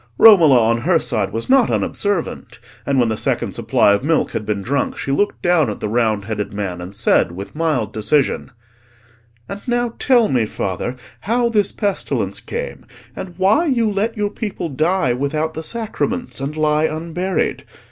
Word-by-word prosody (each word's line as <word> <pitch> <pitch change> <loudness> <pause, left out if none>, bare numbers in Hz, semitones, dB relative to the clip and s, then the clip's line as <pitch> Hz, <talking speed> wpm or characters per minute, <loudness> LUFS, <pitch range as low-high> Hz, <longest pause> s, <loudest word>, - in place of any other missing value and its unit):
Romola 170 - +8
on 115 +1 +2
her 165 +7 +2
side 110 -10 -1
was 115 +2 -3
not 265 -2 +4
unobservant; 200 -5 -2 0.3
and 140 -1 +1
when 120 -3 +3
the 110 - 0
second - - -1
supply 100 - +2
of 100 - 0
milk 160 +2 +1
had 105 - -4
been 100 -2 -2
drunk, 140 +5 -1
she 135 - -3
looked 205 +9 0
down 175 -7 +3
at 105 - -5
the - - -3
round 110 -2 0
headed 105 -1 -3
man, 95 -4 -4
and 90 +3 -8
said 105 -4 +2
with 95 +3 -8
mild 150 -10 -1
decision— 115 +6 0 1.0
"And 200 +1 -7
now 240 -1 0
tell 240 -4 +4
me, 120 - +1
father, 100 +5 -3 0.2
how 235 +2 +1
this 210 -4 +1
pestilence 205 -3 -2
came, - - -6 0.3
and 180 -2 -7
why 205 - +3
you 235 -6 +1
let 215 +3 -1
your 205 -1 -1
people 205 -6 -4
die 155 -1 +1
without 150 +5 -2
the 160 - -5
sacraments; 235 - -3
and 145 +3 -4
lie 155 0 +2
unburied. 170 +3 -2
155 Hz, 175 wpm, -19 LUFS, -, 1.0 s, Romola